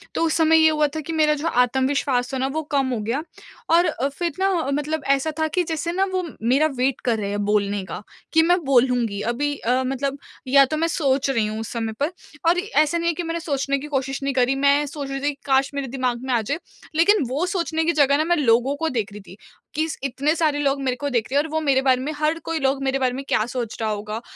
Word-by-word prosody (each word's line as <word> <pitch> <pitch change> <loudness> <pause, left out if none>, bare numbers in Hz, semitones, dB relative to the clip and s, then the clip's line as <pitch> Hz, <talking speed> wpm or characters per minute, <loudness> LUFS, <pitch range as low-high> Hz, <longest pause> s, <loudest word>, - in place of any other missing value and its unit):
तो - - +1
उस 320 - +1
समय 320 0 +5
ये 315 0 +6
हुआ 300 -1 +2
था - - -1
कि 325 +2 -6
मेरा 305 -1 +3
जो 300 +3 -3
आत्मविश्वास 260 -1 +1
था 265 - 0
ना 260 - 0
वो 315 - -1
कम 275 -2 +2
हो 230 - -2
गया, 235 +8 -2 0.5
और 340 +1 +4 0.2
फिर 335 +5 -3
ना 385 +1 +2 0.2
मतलब 295 +2 -2
ऐसा 295 +3 -2
था 315 - +2
कि 355 +4 0
जैसे 325 0 -3
ना 380 +2 +1
वो 370 -1 0 0.2
मेरा 260 +7 +3
वेट 260 +1 0
कर 235 -3 +2
रहे 200 -1 -3
हैं 205 0 -2
बोलने 205 -1 0
का, 185 - -7 0.3
कि 320 - +6
मैं 350 +3 +3
बोलूँगी 245 -5 +2
अभी 290 +3 -1
अ, 250 +2 0
मतलब 270 +2 -2 0.3
या 275 +1 +6
तो 310 +4 -3
मैं 330 +2 +1
सोच 275 -4 +1
रही 230 -5 +1
हूँ 215 +1 -4
उस 225 - -5
समय 225 -2 -3
पर 290 +4 0 0.4
और 355 +1 +3
ऐसा 340 -5 +1
नहीं 335 0 -1
है - - +1
कि 350 - -4
मैंने 335 0 -3
सोचने 280 -3 -1
की 295 - -7
कोशिश 270 -1 -2
नहीं 275 0 0
करी। 255 +1 +2
मैं 280 +2 +3
सोच 285 -1 -6
रही 275 0 -3
थी 290 - +1
कि 275 - -21
काश 270 0 +2
मेरे 280 -1 -3
दिमाग 250 -1 -2
में 260 - -1
आ 235 - +2
जाए 220 - -3 0.4
लेकिन 345 +3 +4
वो 285 +7 0
सोचने 340 -3 -1
की 335 - +3
जगह 280 -1 +4
ना 310 - +2
मैं 345 +1 +2
लोगों 260 -1 +2
को 325 +2 -1
देख 220 -6 -2
रही 205 +1 -9
थी - - -11 0.4
कि 310 - +1
इस 320 - -5
इतने 280 +3 0
सारे 305 -3 +1
लोग 280 -1 0
मेरे 255 -2 0
को 285 +2 -3
देख 235 -5 0
रहे 280 - +2
हैं 290 - +2
और - - -7
वो 315 - +1
मेरे 275 -3 +2
बारे 260 -1 +2
में 285 +4 -3
हर 310 +2 0
कोई 330 -1 -2
लोग 275 0 0
मेरे 270 0 0
बारे 255 -2 +1
में 270 +2 -5
क्या 215 - +1
सोच 240 -2 -4
रहा 220 - 0
होगा? 210 +1 -4
275 Hz, 265 wpm, -22 LUFS, 250-315 Hz, 0.5 s, ये